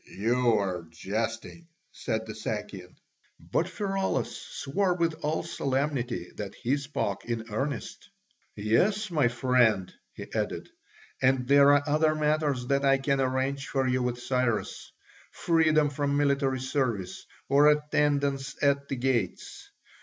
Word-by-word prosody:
"You 120 +2 +2
are 90 -4 -2
jesting," 110 - -4 0.2
said 110 0 -3
the 110 - -7
Sakian. 105 -4 -6 0.4
But 170 - -1
Pheraulas 195 0 -2
swore 180 +6 -2
with 170 -2 +1
all 150 +2 -1
solemnity 130 - -2
that 100 -2 -6
he 130 +4 0
spoke 140 -8 -3
in 115 -2 -3
earnest. 140 - -4 0.5
"Yes, 185 - +1
my 150 -6 +3
friend," 120 -5 +2 0.2
he - - -7
added, - - -3 0.5
"and 130 -1 +2
there 140 +1 +6
are 145 0 +4
other 155 +1 +2
matters 150 -4 0
that 140 +2 +1
I 135 0 +4
can 135 0 0
arrange 135 +1 -1
for 135 -1 0
you 130 0 +1
with 125 -1 -1
Cyrus: 125 -3 -2 0.4
freedom 155 -3 +2
from 145 -1 -1
military 140 -2 +1
service 130 -8 -2 0.2
or 140 +2 +5
attendance 145 -2 +1
at 140 0 +2
the 135 - -3
gates. 120 -7 -2
135 Hz, 130 wpm, -28 LUFS, 120-145 Hz, 0.5 s, there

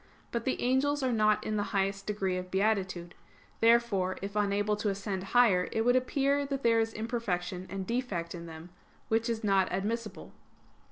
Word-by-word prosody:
But 235 -1 -3
the 260 - 0
angels 270 +3 +2
are 255 - +1
not 215 -2 +2
in 215 0 -1
the - - +1 0.2
highest 195 0 -1
degree 195 -3 -1
of 185 0 -5
beatitude. 190 -3 0 0.5
Therefore 225 -5 +3
if 200 +1 -5
unable 205 0 +1
to 210 0 -1
ascend 195 -1 -3
higher, 195 -5 +4
it 225 - 0
would 245 +1 +4
appear 275 +2 +1
that 275 -1 -4
there 230 -1 +4
is 225 0 0
imperfection 195 -5 -3
and 190 +1 -4
defect 200 -8 -2
in 170 -1 -8
them; 160 +2 -10 0.4
which 225 +1 +1
is 225 -1 -2
not 195 -2 +3
admissible. 215 +4 -3
210 Hz, 175 wpm, -30 LUFS, 190-235 Hz, 0.5 s, higher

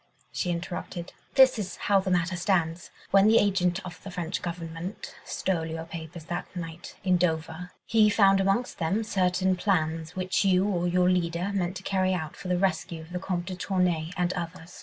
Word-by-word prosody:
she 180 - -2
interrupted. 175 0 -4 0.2
"This 260 -3 +6
is 190 -4 -4
how 200 -1 +2
the 190 0 -2
matter 180 0 +1
stands. 175 -2 0 0.2
When 195 +1 +6
the 225 +1 +6
agent 190 -3 +2
of 175 -2 -9
the 195 - -8
French 180 -1 -3
Government 170 +2 -6
stole 180 -4 -1
your 160 0 -5
papers 165 0 -8
that 175 +1 -4
night 165 -1 -7
in 185 -2 +3
Dover, 165 0 -1 0.2
he 215 -1 +4
found 195 -2 +5
amongst 195 +6 0
them 190 +7 0
certain 185 -2 +1
plans, 165 -3 0
which 185 +1 0
you 190 -1 +4
or 175 -3 0
your 180 0 +3
leader 180 +1 +1
meant 185 -1 -1
to 190 - -10
carry 185 -1 +1
out 160 -3 -4
for 190 - -9
the 180 0 +1
rescue 180 -3 -1
of 160 +2 -13
the 180 - -2
Comte 180 -2 -2
de 185 0 -5
Tournay 180 -4 0
and 180 0 +1
others. 175 0 -7
180 Hz, 190 wpm, -27 LUFS, 170-190 Hz, 0.2 s, This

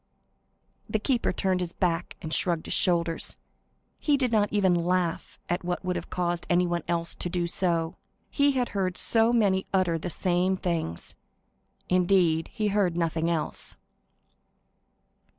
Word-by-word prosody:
The - - +1
keeper 235 +3 0
turned 190 -2 0
his 175 -1 -3
back, 175 -2 -1
and 160 -1 -3
shrugged 170 -3 0
his - - -1
shoulders; 170 -2 +1 0.6
he 295 -2 +2
did 255 -3 0
not 210 -2 +2
even 195 -3 +3
laugh 175 0 -1
at 175 +1 -1
what 180 +1 -3
would 180 0 -1
have 175 - -5
caused 175 -1 -2
anyone 175 -1 +2
else 170 -1 -1
to 175 - -3
do 175 -1 -1
so; 170 -2 -1 0.3
he 285 -1 +3
had 250 -2 0
heard 185 -3 -1
so 225 0 +3
many 200 -5 +2
utter 180 -4 +1
the 175 - -4
same 180 +2 +1
things,—indeed, 175 - -1
he 215 -2 -1
heard 195 -4 +1
nothing 165 -1 0
else. 165 -2 -1
180 Hz, 145 wpm, -27 LUFS, 170-195 Hz, 0.6 s, even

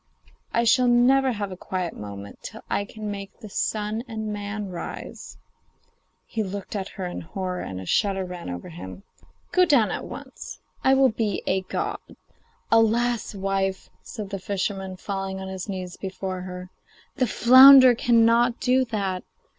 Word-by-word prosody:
I 235 - +2
shall 245 +2 +4
never 255 +2 +4
have 205 -2 -4
a - - -5
quiet 180 -1 -4
moment 100 -1 -9
till 220 - -9
I 200 - 0
can 210 0 -6
make 200 -1 -8
the 215 -3 -10
sun 215 +2 -2
and 220 -2 -4
man 205 0 -5
rise.' 175 - -8 0.9
He 225 - -3
looked 200 0 -5
at 195 -2 -3
her 190 - -3
in 175 - -5
horror, 180 +2 -4
and 95 -1 -6
a 95 - -8
shudder 195 - +1
ran 180 - -7
over 90 0 -6
him. 95 +3 -9 0.5
'Go 365 - +5
down 280 -11 +4
at - - -4
once; - - -9 0.2
I 265 - +5
will 265 -1 +5
be 215 -3 -2
a 190 0 +1
god.' 185 - -3 0.7
'Alas! 225 0 +2
wife,' 195 -1 -2
said 210 -3 -8
the 195 - -3
fisherman, 195 0 -3
falling 195 0 -4
on 190 0 -6
his 190 +1 -6
knees 185 -2 -5
before 190 -1 -5
her, 180 0 -8 0.5
'the 255 -3 +2
flounder 260 +2 +9
cannot 235 0 +3
do 255 +1 +3
that. 195 -5 -2
200 Hz, 160 wpm, -24 LUFS, 185-230 Hz, 0.9 s, flounder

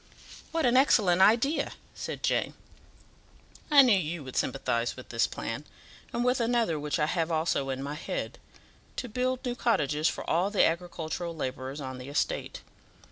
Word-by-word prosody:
"What 325 -3 0
an 245 0 +3
excellent 205 -9 +4
idea!" 235 +10 +3 0.2
said - - -6
Jane. - - 0 1.1
"I 290 -2 +8
knew 245 -4 +5
you 170 -3 -2
would 130 -1 -9
sympathize 120 -2 0
with 130 - -11
this 115 0 +2
plan, - - -5 0.5
and 240 - -1
with 250 +1 +2
another 230 -9 +1
which 150 0 -1
I 150 - +2
have 165 +1 -1
also 155 -4 0
in 135 0 -3
my 140 +1 -4
head 150 - -4 0.6
to 250 - -4
build 255 +3 -1
new 245 - -1
cottages 155 - +1
for - - -3
all 175 +4 +2
the 205 - +4
agricultural 170 0 -3
labourers 130 -1 -4
on 130 -2 -6
the 125 +2 -8
estate. 145 - -2
170 Hz, 165 wpm, -29 LUFS, 140-240 Hz, 1.1 s, I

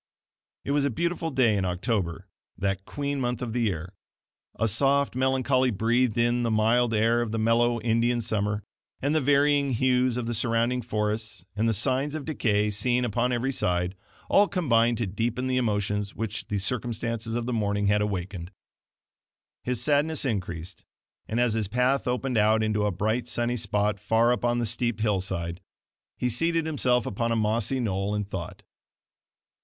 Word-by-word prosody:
It - - -2
was 145 0 +2
a 140 - +2
beautiful 170 +5 -2
day 130 -7 +3
in 100 - 0
October, 90 -1 -2 0.3
that 95 0 -2
queen 140 -1 -3
month 125 -1 -1
of 120 -3 -4
the 120 - 0
year. 90 -4 -2 0.6
A 115 - +1
soft 140 +6 +2
melancholy 130 0 +2
breathed 115 +2 +1
in 120 +1 +2
the 120 - 0
mild 115 +2 +2
air 115 +2 +2
of 115 -2 -2
the 115 - -2
mellow 115 +2 +2
"Indian 120 +1 +1
summer," 105 -2 -1 0.4
and 140 +3 0
the 155 - +2
varying 140 0 +3
hues 125 0 +2
of 125 - -2
the 120 - -2
surrounding 115 +2 +1
forests, 105 -4 -3
and 110 +2 +1
the - - +2
signs 135 +6 +1
of 150 -3 -5
decay 105 -9 +1
seen 120 +4 +1
upon 120 +2 0
every 125 +2 0
side, 90 -6 0 0.3
all 205 +1 +5
combined 120 - +2
to 115 - -1
deepen 115 +6 -2
the 130 0 0
emotions 105 -3 -1
which 110 -1 -4
the 105 - -2
circumstances 115 +2 -3
of 120 -1 -2
the 125 - -2
morning 100 -2 0
had 105 +1 +3
awakened. 95 -3 -3 1.1
His 125 -1 -2
sadness 150 +2 +1
increased; 90 -7 -4 0.4
and 115 - -1
as 120 -2 +2
his 110 -3 -1
path 125 +5 +1
opened 125 -1 0
out 110 +1 +3
into 105 -1 +1
a - - 0
bright, 110 +6 -1
sunny 120 0 0
spot 105 -2 0
far 115 +3 +3
up 120 - -4
on 120 0 +2
the 120 - 0
steep 115 +1 0
hillside, 95 -4 -2 0.6
he 125 - 0
seated 165 +7 +1
himself 125 -6 +1
upon 115 +4 -2
a - - +2
mossy 110 +4 +1
knoll 100 -3 -1
and 105 -1 -2
thought. 95 -4 -7
115 Hz, 175 wpm, -26 LUFS, 105-125 Hz, 1.1 s, all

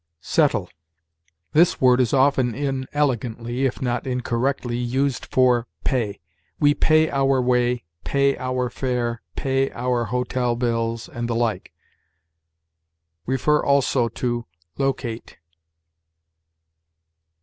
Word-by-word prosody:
SETTLE. - - +1 0.8
This 170 +3 +4
word 125 0 +5
is 120 - +1
often 130 -3 +3
inelegantly, 130 -3 -1
if 130 - -5
not 120 0 -1
incorrectly, 125 0 -1
used 125 +2 -1
for 125 -2 +3 0.2
pay. 115 -6 -1 0.4
We 145 -1 +5
pay 155 +1 +3
our 135 -1 +2
way, 125 -1 +1 0.2
pay 140 0 +2
our 130 -1 -2
fare, 120 -3 -2
pay 135 0 0
our 120 -1 -1
hotel 125 0 -1
bills, 115 -1 -1
and 120 0 -5
the 115 - 0
like. 115 -2 -1 1.6
See, 130 +2 -2
also, 140 -4 +3 0.7
LOCATE. 130 -4 -3
125 Hz, 100 wpm, -23 LUFS, 120-135 Hz, 1.6 s, word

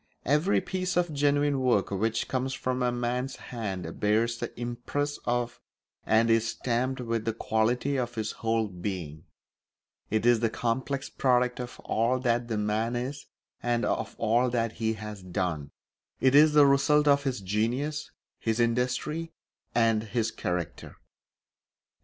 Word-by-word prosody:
Every 150 +8 +3
piece 185 -1 -2
of 175 -3 +1
genuine 145 0 +2
work 120 -7 +2
which 110 +3 0
comes 130 0 -1
from 130 0 -2
a 125 0 +2
man's 125 +2 -2
hand 95 -8 -5
bears 115 +3 +2
the - - -4
impress 125 +5 -3
of 120 0 -1 0.5
and 115 +1 +4
is 115 0 +3
stamped 125 +3 -1
with 115 -2 -1
the 115 - 0
quality 120 +5 0
of 120 -1 -2
his 110 -1 -2
whole 115 -1 0
being; 90 -5 -5 0.8
it 110 +1 0
is 120 -1 +5
the 115 0 +1
complex 130 +5 -2
product 125 -1 +1
of 125 -1 -6
all 115 +3 +1
that 120 -1 +1
the 110 -2 -2
man 110 +3 0
is 135 +4 -4 0.3
and 120 0 0
of - - -2
all 120 +3 +2
that 115 -2 -1
be 110 -1 +1
has 105 -2 -7
done; 85 -5 -2 0.5
it 130 0 +4
is 150 +1 +7
the 150 -1 +7
result 140 +2 +4
of 140 0 +5
his 130 -3 -1
genius, 120 +10 -1 0.3
his 115 0 -1
industry, 125 +7 0 0.4
and 115 -2 +3
his 115 0 -1
character. 90 -2 -4
120 Hz, 150 wpm, -28 LUFS, 110-130 Hz, 0.8 s, is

